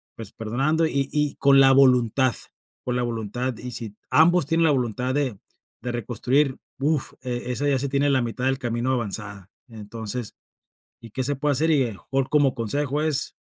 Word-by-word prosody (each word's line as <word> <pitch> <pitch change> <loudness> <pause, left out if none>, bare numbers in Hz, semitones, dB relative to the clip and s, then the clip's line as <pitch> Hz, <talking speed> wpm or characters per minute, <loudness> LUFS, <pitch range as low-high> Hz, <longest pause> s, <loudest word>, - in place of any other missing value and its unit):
pues, 110 -3 -9
perdonando 135 +9 0
y-y 145 0 0
con 140 0 +5
la 135 0 +7
voluntad, 130 -1 +4 0.5
con 125 0 -2
la 125 - 0
voluntad, 120 +2 -3
y 125 - -6
si 110 -3 -6
ambos 175 +1 +4
tienen 165 +2 +2
la 160 - +4
voluntad 125 -1 -1
de 130 -9 -1 0.4
de 125 - -3
reconstruir, 125 +4 0 0.2
uf, 145 0 0
e 125 -1 -3
esa 145 +3 0
ya 135 -2 +2
se 140 - -2
tiene 140 +1 +1
la 135 -2 +2
mitad 120 +2 -3
del 135 0 0
camino 120 0 -1
avanzada, 105 -5 -4 0.2
entonces 110 +1 -6 0.7
¿y 115 - -12
qué 130 - -2
se 145 +3 0
puede 145 +2 0
hacer? 155 +4 +2
Y 145 -4 +3
a - - -1
lo - - -6
mejor 135 +6 -2
como 145 -4 +3
consejo 140 +5 -1
es 155 -3 0
130 Hz, 185 wpm, -24 LUFS, 115-140 Hz, 0.7 s, la